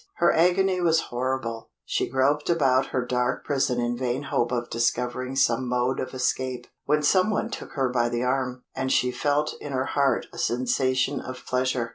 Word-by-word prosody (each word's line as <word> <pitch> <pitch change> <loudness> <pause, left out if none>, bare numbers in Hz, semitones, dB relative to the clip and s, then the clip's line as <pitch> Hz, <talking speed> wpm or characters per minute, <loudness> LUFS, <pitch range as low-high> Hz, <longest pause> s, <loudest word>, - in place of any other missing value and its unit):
Her 175 - +3
agony 180 +2 +3
was 165 -2 +4
horrible; 120 -2 -3 0.2
she - - -1
groped 140 +4 +1
about 135 -6 +3
her 125 -1 -2
dark 125 0 -1
prison 135 -3 0
in 120 0 0
vain 125 +2 -2
hope 125 - 0
of 120 -1 -1
discovering 125 +2 -1
some 125 -1 +2
mode 125 +1 0
of 130 - -4
escape, 130 0 -1 0.2
when 150 +1 +2
some 185 +7 +4
one 220 +2 -1
took - - -7
her 135 -2 +1
by 120 -1 +1
the 120 +1 -1
arm, 125 -1 -1
and 130 0 -1
she 125 - +2
felt 145 +3 0
in 145 - -6
her 130 0 0
heart 140 -1 +1
a - - -8
sensation 130 +3 +1
of 130 0 -8
pleasure. 125 -2 0
130 Hz, 185 wpm, -25 LUFS, 125-140 Hz, 0.2 s, was